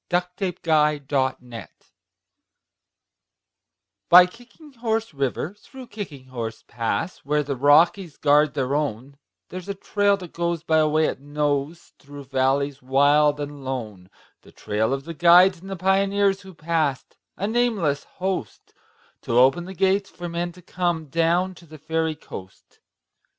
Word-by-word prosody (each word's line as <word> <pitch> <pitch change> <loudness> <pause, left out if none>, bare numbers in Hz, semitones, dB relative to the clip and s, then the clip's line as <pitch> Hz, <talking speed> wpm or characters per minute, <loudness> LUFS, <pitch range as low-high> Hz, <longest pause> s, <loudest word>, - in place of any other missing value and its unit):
SONG 175 -1 +2
OF 180 - -27
THE 190 -3 -2
KICKING 150 -4 +1
HORSE 130 -4 -2 2.4
By 180 +1 +9
Kicking 245 - -16
Horse 225 -4 -2
River, 140 +5 -2
through 255 +5 -13
Kicking 165 -11 -8
Horse 115 -3 -6
Pass, 120 +9 -3
Where 150 +1 0
the 140 -1 -3
Rockies 155 +5 +3
guard 150 +1 +3
their 135 -1 -1
own, 140 -2 -3 0.3
There's 185 +1 -8
a 200 - -3
trail 200 +1 +1
that 180 -4 -11
goes 170 -1 -2
by 160 0 +2
a 155 - +3
way 155 +1 +2
it - - -2
knows 145 +2 -3
Through 140 0 -11
valleys 135 +1 0
wild 145 +3 +3
and 145 -1 -6
lone,— 110 -8 -6 0.3
The - - -18
trail 110 +2 -2
of 135 0 -2
the 165 - -6
guides 175 +2 +5
and 190 - -10
the 195 - -4
pioneers 195 +1 +1
Who 190 -2 -13
passed—a 160 +3 -3
nameless 210 -11 0
host— 185 - -5 0.5
To 115 - -1
open 135 +8 +4
the 190 +1 -9
gates 195 +2 +1
for 175 - -7
men 170 +1 -3
to 180 0 -16
come 175 -4 -2
Down 170 +4 +1
to 170 -1 -17
the 155 0 -12
Fairy 160 +1 -2
Coast. 95 -10 -12
155 Hz, 150 wpm, -23 LUFS, 140-185 Hz, 2.4 s, By